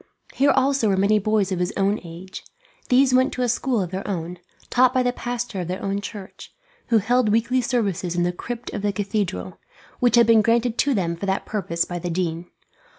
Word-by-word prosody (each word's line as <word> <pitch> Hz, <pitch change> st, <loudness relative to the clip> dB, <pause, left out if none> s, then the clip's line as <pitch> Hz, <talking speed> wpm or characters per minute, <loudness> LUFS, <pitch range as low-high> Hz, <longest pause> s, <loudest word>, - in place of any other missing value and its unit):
Here 280 Hz, +1 st, +3 dB
also 270 Hz, -4 st, +2 dB
were 195 Hz, -, +1 dB
many 205 Hz, +2 st, +3 dB
boys 210 Hz, -1 st, +1 dB
of 185 Hz, -, -1 dB
his 180 Hz, +2 st, 0 dB
own 200 Hz, +2 st, +1 dB
age. 175 Hz, +2 st, -9 dB, 0.5 s
These 255 Hz, +1 st, +4 dB
went 260 Hz, +2 st, +4 dB
to 255 Hz, -, -2 dB
a -, -, +1 dB
school 240 Hz, -2 st, 0 dB
of 180 Hz, -, -7 dB
their 190 Hz, +1 st, -5 dB
own, 175 Hz, -2 st, -4 dB, 0.3 s
taught 255 Hz, +1 st, +4 dB
by 255 Hz, -, +3 dB
the 245 Hz, 0 st, 0 dB
pastor 245 Hz, -4 st, -4 dB
of 175 Hz, -, -5 dB
their 185 Hz, +1 st, -4 dB
own 200 Hz, 0 st, -1 dB
church, 200 Hz, -1 st, -9 dB, 0.4 s
who 230 Hz, -, +4 dB
held 240 Hz, +2 st, +2 dB
weekly 235 Hz, +4 st, +2 dB
services 200 Hz, -8 st, -1 dB
in 175 Hz, -, +1 dB
the 175 Hz, -, +1 dB
crypt 240 Hz, +6 st, -6 dB
of 205 Hz, -, -3 dB
the 205 Hz, 0 st, 0 dB
cathedral, 195 Hz, -, -3 dB, 0.4 s
which 245 Hz, -1 st, +3 dB
had 235 Hz, -1 st, +6 dB
been 225 Hz, -1 st, +5 dB
granted 230 Hz, +1 st, +1 dB
to 280 Hz, -2 st, +2 dB
them 170 Hz, -4 st, -1 dB
for 195 Hz, +4 st, -5 dB
that 190 Hz, 0 st, -1 dB
purpose 170 Hz, -5 st, -2 dB
by 175 Hz, 0 st, -5 dB
the 175 Hz, +1 st, -4 dB
dean. 170 Hz, 0 st, -2 dB
205 Hz, 215 wpm, -23 LUFS, 185-245 Hz, 0.5 s, had